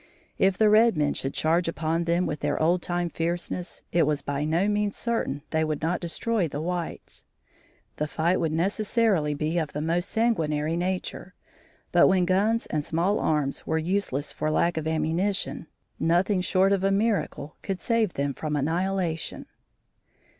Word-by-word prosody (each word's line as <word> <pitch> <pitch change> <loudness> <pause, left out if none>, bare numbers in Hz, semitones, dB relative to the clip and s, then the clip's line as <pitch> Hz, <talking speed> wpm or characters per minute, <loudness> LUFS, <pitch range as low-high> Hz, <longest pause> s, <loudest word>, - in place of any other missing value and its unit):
If 190 -1 +3
the 215 - +4
red 215 -2 +5
men 145 -1 +2
should 135 - -4
charge 165 +2 +2
upon 165 +2 -1
them 170 +2 +1
with 150 - -3
their 145 0 -1
old 175 +3 +2
time 175 0 -1
fierceness, 175 +1 -3
it 165 -3 +3
was 150 -2 0
by 145 +1 -2
no 165 +6 +1
means 210 -1 0
certain 225 - -2
they 160 0 +1
would 155 0 -2
not 170 +2 0
destroy 185 +3 -1
the 145 -1 -5
whites. 175 +1 -5 0.7
The 150 - -1
fight 170 +4 +1
would 165 -2 0
necessarily 195 -2 +1
be 155 +4 0
of 155 -3 -3
the 150 - -3
most 170 +4 -1
sanguinary 160 -9 +1
nature, 180 +1 -3 0.6
but - - +6
when 185 -2 +3
guns 205 +5 +2
and 150 -1 -2
small 170 +7 0
arms 150 -3 -1
were 160 - +1
useless 160 -4 -1
for 155 - -1
lack 170 +2 +2
of 160 -1 -2
ammunition, 160 +4 -1 0.3
nothing 180 +4 +2
short 190 +1 +2
of 195 -1 +1
a 195 - +3
miracle 195 -7 -1
could 195 -2 -3
save 230 -5 +1
them 140 0 -1
from 150 +2 -3
annihilation. 165 +2 -1
170 Hz, 170 wpm, -26 LUFS, 155-195 Hz, 0.7 s, but